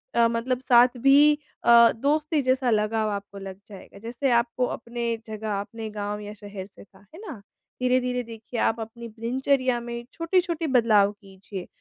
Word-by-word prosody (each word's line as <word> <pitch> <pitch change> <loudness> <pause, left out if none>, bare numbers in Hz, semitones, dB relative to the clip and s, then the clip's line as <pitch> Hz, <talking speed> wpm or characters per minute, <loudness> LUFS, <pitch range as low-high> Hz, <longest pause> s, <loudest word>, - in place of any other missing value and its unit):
अ, 235 0 +5
मतलब 235 +2 -1
साथ 245 0 +4
भी 285 +3 +6 0.3
अ, 235 0 +7
दोस्ती 300 +4 0
जैसा 255 -1 +1
लगाव 215 0 +1
आपको 200 0 -6
लग 195 -1 -8
जाएगा, 200 0 -13
जैसे 240 +4 -2
आपको 235 +1 +1
अपने 235 -1 -3
जगह 215 -2 -3
अपने 220 +2 -6
गाँव 210 0 -4
या 210 0 -8
शहर 200 -2 -9
से - - -13
था, 195 -1 -22 0.2
है 345 - -11
ना? 255 - -8 0.4
धीरे-धीरे 250 0 +1
देखिए 230 +1 -7
आप 225 - +1
अपनी 230 +1 -7
दिनचर्या 255 +1 +1
में 235 0 -6
छोटी-छोटी 335 -1 0
बदलाव 220 -6 +4
कीजिए। 195 -2 -10
235 Hz, 165 wpm, -25 LUFS, 210-255 Hz, 0.4 s, अ